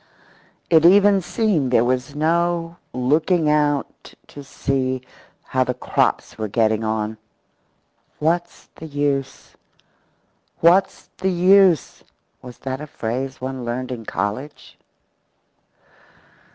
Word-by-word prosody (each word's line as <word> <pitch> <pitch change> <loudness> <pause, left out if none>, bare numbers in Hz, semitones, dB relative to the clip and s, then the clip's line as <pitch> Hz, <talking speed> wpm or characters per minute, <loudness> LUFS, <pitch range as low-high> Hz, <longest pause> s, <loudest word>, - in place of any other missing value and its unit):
It 160 -2 +6
even 200 +2 +6
seemed 180 - 0
there 120 -1 +3
was 130 +3 -2
no 170 +2 0
use 125 - -5
looking 160 0 +2
out 145 -2 -1
to 145 - -10
see 130 -2 -2 0.4
how - - 0
the - - -3
crops - - -1
were 110 - -2
getting 110 +1 +1
on. 110 0 -2 1.0
What's 170 +3 -2
the 160 - -10
use? 140 -2 -3 1.1
What's 175 +4 +2
the 190 - 0
use? 185 -2 +3 0.4
Was 125 -1 -11
that 130 +1 -3
a 150 - -7
phrase 130 +1 -4
one 130 0 -5
learned 125 +2 -4
in 115 -3 -6
college? 105 +11 -5
145 Hz, 110 wpm, -21 LUFS, 125-170 Hz, 1.1 s, It